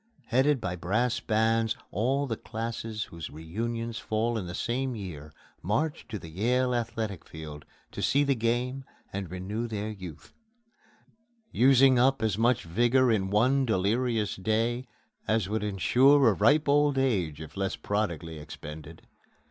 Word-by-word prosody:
Headed 135 +3 +2
by 90 -5 -3
brass 110 +7 0
bands, 115 0 +1
all 130 +8 +1
the 115 -4 -2
classes 115 -1 -4
whose 85 -3 -8
reunions 115 +9 -4
fall 115 +2 -1
in 100 -5 -3
the 85 - -5
same 130 +1 -2
year 80 -8 -7 0.3
march 145 - -1
to 110 - -4
the 85 - -10
Yale 125 +8 +1
Athletic 115 -5 -3
Field 75 -2 -9 0.3
to - - -6
see 140 +1 +3
the 140 -1 +2
game 125 +3 -1 0.3
and 95 -3 -4
renew 100 +6 -4
their 110 -1 -3
youth 95 -7 -10 1.2
using 130 0 +5
up 135 0 +3
as 110 -4 +1
much 115 +2 +2
vigor 120 +8 +3
in 95 -3 +1
one 125 +7 +3
delirious 110 0 0
day 115 +5 0 0.4
as 110 -3 +1
would 105 +1 -2
insure 125 +8 +4
a - - +3
ripe 145 - +3
old 145 -1 +3
age 95 - 0
if 80 -1 -9
less 95 -1 -1
prodigally 85 -6 -3
expended. 75 +1 -10
110 Hz, 150 wpm, -28 LUFS, 95-125 Hz, 1.2 s, using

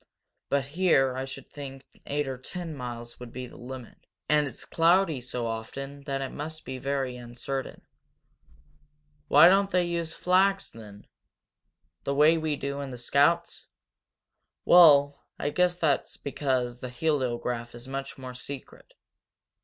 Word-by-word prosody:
But 140 -1 +1
here 140 -4 +2
I 130 +1 -3
should 135 0 -9
think 135 -2 -9 0.2
eight 145 0 -1
or 130 -1 -4
ten 170 +4 -6
miles 120 -2 -7
would 125 -1 -9
be 125 +1 -6
the 125 - -13
limit. 125 -1 -10 0.2
And 150 -1 +3
it's - - -7
cloudy 165 -3 +3
so 125 -1 -4
often 135 +5 -5
that 135 -1 -2
it 135 - -5
must 155 +2 -6
be 130 0 -5
very 135 -2 -2
uncertain." 125 +2 -6 1.4
"Why 150 +4 +8
don't 195 +2 +4
they 180 -2 +2
use 170 -1 -2
flags, 195 +2 +2
then?" 105 -2 -12 1.0
"The 140 - -1
way 150 +3 +6
we 155 -2 -1
do 140 0 -4
in 140 - -5
the 125 - -7
scouts? 145 +8 +1 1.0
Well, 145 -5 +7 0.2
I 145 - -2
guess 180 +1 +2
that's 155 -5 0
because 130 -4 -1
the 125 - -6
heliograph 125 -5 -1
is 120 - -7
so 130 - -8
much 135 0 -5
more 130 -1 -8
secret. 130 +2 -9
140 Hz, 150 wpm, -28 LUFS, 125-155 Hz, 1.4 s, Why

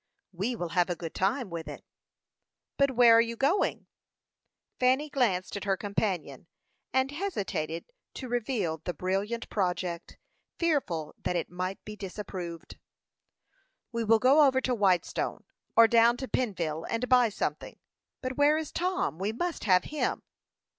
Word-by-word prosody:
"We 200 +7 -2
will 175 -6 -4
have 175 +1 +1
a 175 - 0
good 165 -1 -7
time 200 +2 0
with 165 -1 -5
it." - - -9 0.9
"But 275 0 +3
where 235 -1 +7
are 230 - +7
you 230 0 -2
going?" 285 - +1 0.9
Fanny 260 +4 +2
glanced 195 -10 0
at 200 - -5
her 195 -1 +1
companion, 185 -8 -3 0.4
and 260 +2 +1
hesitated 205 - -3 0.3
to 260 - -6
reveal 225 -9 -1
the 175 +2 -5
brilliant 195 +7 -2
project, 180 -3 -2 0.4
fearful 225 - 0
that 180 - -2
it 170 - -2
might 185 +2 -4
be 210 - -7
disapproved. 185 -4 -7 1.1
"We 230 -1 -2
will 225 +1 +5
go 275 +6 +6
over 260 -1 +2
to 255 - 0
Whitestone, 190 -6 0 0.3
or 230 0 +8
down 235 +1 +5
to 265 - -5
Pennville, 170 -12 -2
and 235 +2 -1
buy 250 -2 +5
something. 205 - -4 0.5
But 255 0 -3
where 290 +1 +5
is 315 -2 -4
Tom? 365 - -1
We 200 +3 -1
must 340 +7 -3
have 185 -3 +5
him." 300 - -2
215 Hz, 150 wpm, -29 LUFS, 180-255 Hz, 1.1 s, or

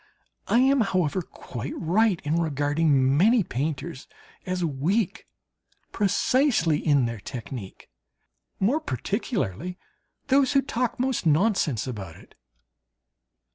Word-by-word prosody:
I - - +3
am, 270 0 +4
however, 185 -4 0
quite 130 -5 -7
right 190 +2 +2
in 155 +2 0
regarding 145 -3 +2
many 215 +8 +4
painters 150 +1 -4 0.4
as 180 -1 -1
weak 175 +9 -1 0.6
precisely 205 - +2
in 145 -5 +2
their 115 -2 -4
technique 120 -3 -8 0.7
more 235 +11 +2
particularly 180 - -3 0.5
those 275 +1 +3
who 275 -1 +4
talk 245 -2 -2
most 255 -8 0
nonsense 160 - +2
about 100 -10 -6
it. - - -17
170 Hz, 105 wpm, -25 LUFS, 140-225 Hz, 0.7 s, am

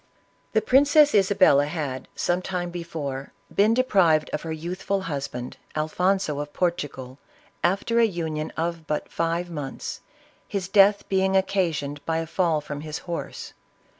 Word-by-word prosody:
The 220 - +3
Princess 290 +4 +5
Isabella 190 -8 +5
had, 145 -5 -4
some 175 +1 0
time 180 -2 -3
before, 155 -6 -5 0.2
been 215 +3 +4
deprived 185 -11 +3
of - - -2
her 165 - -5
youthful 180 +5 -2
husband, 140 -7 -5 0.2
Alfonso 155 +1 0
of 145 0 -5
Portu 170 -5 0
gal, 130 +1 -10 0.4
after 200 +7 +2
a 230 - +6
union 160 -6 -3
of 165 -1 -3
but 150 - -2
five 170 +1 -1
mouths, 145 -4 -5 0.5
his 195 -2 -3
death 200 +1 +5
being 190 0 +2
occasioned 160 -7 -1
by 165 0 +1
a 165 - -1
fall 165 -2 +1
from 145 -1 -6
his 155 0 -5
horse. 170 -2 -5
170 Hz, 145 wpm, -25 LUFS, 150-190 Hz, 0.5 s, a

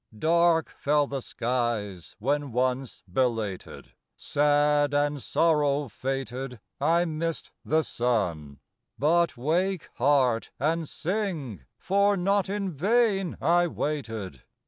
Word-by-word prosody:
Dark 165 +3 +3
fell 145 0 +2
the 140 -1 -4
skies 115 -8 -3
when 140 +4 -1
once 125 +1 -1
belated, 110 -2 -2 0.3
Sad, 145 0 +2
and 145 -1 +1
sorrow 150 -4 +1
fated 130 +1 -4 0.2
I 165 +5 +3
missed 165 0 -3
the 155 +1 +2
suci; 90 - -1 0.4
But 165 0 +2
wake 175 +7 0
heart, 130 -3 +2
and 160 +3 0
sing, 160 - -3
for 200 +2 +2
not 195 +2 +1
in 200 -1 -2
vain 195 - +1
I 175 +1 +3
waited. 115 - -4
145 Hz, 105 wpm, -27 LUFS, 125-170 Hz, 0.4 s, Dark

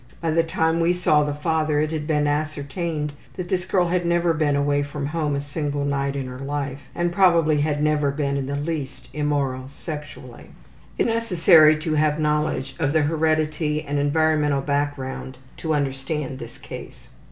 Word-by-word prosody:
By 165 -1 -1
the 165 +1 +4
time 160 0 0
we 170 +1 +3
saw 170 -4 +3
the 145 - -1
father 155 0 0
it 155 +1 0
had 155 -2 -3
been 150 -2 +2
ascertained 150 +1 -2 0.2
that 180 -2 -5
this 185 -2 0
girl 180 -3 +2
had 180 0 +1
never 170 0 +2
been 150 -2 +1
away 145 0 +2
from 145 0 -4
home 150 -1 -1
a 140 - -1
single 145 0 -3
night 140 -1 -1
in 135 -1 -3
her 125 0 -7
life 140 0 -3 0.2
and 175 0 0
probably 170 -5 +4
had 150 0 0
never 150 -1 +2
been 140 0 -1
in 135 -1 -2
the 140 - -2
least 145 -2 -4
immoral 140 -3 -1
sexually. 150 +1 -9 0.5
It - - 0
is - - 0
necessary 170 -8 +5
to 155 0 -2
have 155 0 +2
knowledge 150 -3 0
of 145 - +1
the 160 -2 +3
heredity 155 0 0
and 145 -1 -2
environmental 150 -1 +2
background 140 -2 -3 0.2
to 160 -2 -1
understand 135 0 -2
this - - -9
case. - - -10
150 Hz, 180 wpm, -23 LUFS, 145-160 Hz, 0.5 s, necessary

